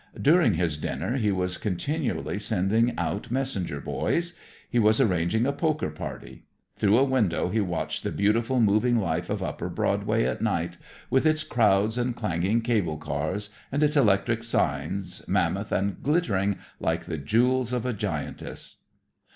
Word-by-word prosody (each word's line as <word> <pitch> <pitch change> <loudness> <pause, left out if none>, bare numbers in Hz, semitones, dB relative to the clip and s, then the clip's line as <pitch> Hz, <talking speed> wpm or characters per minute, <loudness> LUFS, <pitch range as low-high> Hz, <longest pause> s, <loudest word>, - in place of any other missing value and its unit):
During 160 - +4
his 80 -3 0
dinner 120 - -2
he 105 -5 +1
was 90 -1 -1
continually 105 - -2
sending 110 +3 +1
out 100 - -2
messenger 120 - -2
boys. 170 - -1 0.3
He 120 - +1
was 110 0 +4
arranging 105 -1 +2
a 140 - +1
poker 155 - -1
party. 65 -4 -8 0.3
Through 105 +2 +3
a 130 - +5
window 115 -12 +1
he 110 +3 +1
watched 90 -4 -2
the - - -2
beautiful 115 +5 +1
moving 115 +3 +3
life 85 -4 -1
of - - -2
upper - - -4
Broadway - - 0
at 65 +1 -1
night, - - -1 0.3
with 135 +4 +3
its 155 0 +2
crowds 110 -1 +2
and 120 0 -1
clanging 100 +1 0
cable 105 -10 0
cars 80 +8 -3 0.2
and 145 +2 +1
its 150 0 +2
electric 115 -2 +3
signs, 100 -4 -1
mammoth - - 0
and 100 0 -1
glittering 100 - +1 0.2
like 80 0 -1
the 80 - -4
jewels 120 - +2
of 125 -1 -1
a 125 - 0
giantess. 105 - -5
110 Hz, 155 wpm, -26 LUFS, 90-125 Hz, 0.3 s, a